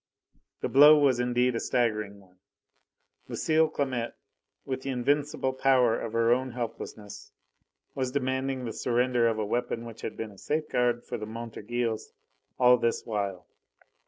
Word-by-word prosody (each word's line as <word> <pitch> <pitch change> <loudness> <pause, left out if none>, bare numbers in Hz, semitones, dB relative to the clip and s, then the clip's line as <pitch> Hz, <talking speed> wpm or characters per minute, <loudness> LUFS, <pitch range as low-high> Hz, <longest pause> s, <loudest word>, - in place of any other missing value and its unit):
The - - 0
blow 150 +3 +8
was 135 -4 +3
indeed 125 0 +1
a - - 0
staggering 105 -5 -1
one. 90 -2 -23 0.9
Lucile 160 0 +2
Clamette, 130 -6 -2 0.5
with 130 -1 -3
the 135 - -5
invincible 135 +1 0
power 130 -3 +3
of 115 - -5
her 115 +1 +4
own 130 0 -2
helplessness, 110 -4 -7 0.6
was 130 -2 -2
demanding 130 -1 -1
the 115 - -4
surrender 120 -1 +1
of 115 -1 0
a 110 - -1
weapon 120 +1 -2
which 115 -1 -10
had - - -5
been 110 -1 -5
a 100 - -16
safeguard 125 -6 0
for - - -5
the 105 - -6
Montorgueils 115 0 -4 0.4
all 125 0 +6
this 115 -1 -1
while. 100 -5 -3
120 Hz, 150 wpm, -28 LUFS, 115-130 Hz, 0.9 s, blow